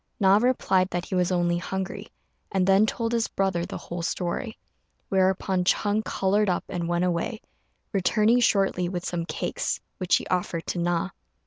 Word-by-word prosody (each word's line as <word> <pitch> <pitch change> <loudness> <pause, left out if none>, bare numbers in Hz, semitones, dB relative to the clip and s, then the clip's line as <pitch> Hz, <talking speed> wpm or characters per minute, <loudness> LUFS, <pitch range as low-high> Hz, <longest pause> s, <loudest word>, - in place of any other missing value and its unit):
Na 195 0 +6
replied 210 -6 +2
that 175 -1 -3
he - - -7
was 180 0 +1
only 175 -1 +1
hungry, 190 +2 -4 0.4
and 190 -2 +2
then 195 +3 +5
told 230 +1 -2
his 230 -1 +1
brother 190 -3 -1
the - - -5
whole 175 0 -6
story; 180 +7 -3 0.5
whereupon 190 -1 +2
Ch'êng 205 +3 +1
coloured 205 +1 +1
up 180 - 0
and 170 -2 -3
went 175 +1 +1
away, 180 +6 -1 0.5
returning 215 +5 +3
shortly 195 -6 +2
with 175 -1 -4
some 170 -1 -3
cakes, 155 - -2 0.2
which 185 -2 +3
he - - -1
offered 175 -2 -2
to 175 - -3
Na. 175 +2 0
185 Hz, 165 wpm, -26 LUFS, 175-200 Hz, 0.5 s, Na